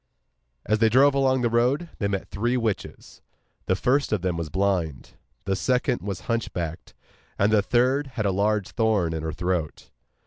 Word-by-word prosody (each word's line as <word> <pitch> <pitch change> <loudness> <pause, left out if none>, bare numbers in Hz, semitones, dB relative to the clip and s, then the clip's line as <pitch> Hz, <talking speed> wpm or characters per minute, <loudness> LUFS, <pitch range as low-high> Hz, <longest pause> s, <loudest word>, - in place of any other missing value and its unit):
As 110 +1 +1
they 115 0 +4
drove 135 +5 +5
along 130 -2 +2
the 120 - +1
road 125 +8 +1
they 100 - 0
met 100 -1 -3
three 120 +5 -1
witches; 115 -4 -4 0.5
the 95 - +2
first 135 +8 +1
of 105 -5 0
them 90 -2 0
was 85 -2 -4
blind, 90 -5 -1 0.3
the 95 0 0
second 125 +3 0
was 100 -2 -5
hunchbacked, 90 -8 -4 0.4
and 105 +2 +2
the 105 - +5
third 125 +8 +1
had 105 - 0
a 100 - +2
large 105 +1 0
thorn 105 -7 +1
in 80 - -3
her 80 0 -3
throat. 85 -1 -3
105 Hz, 175 wpm, -25 LUFS, 95-125 Hz, 0.5 s, drove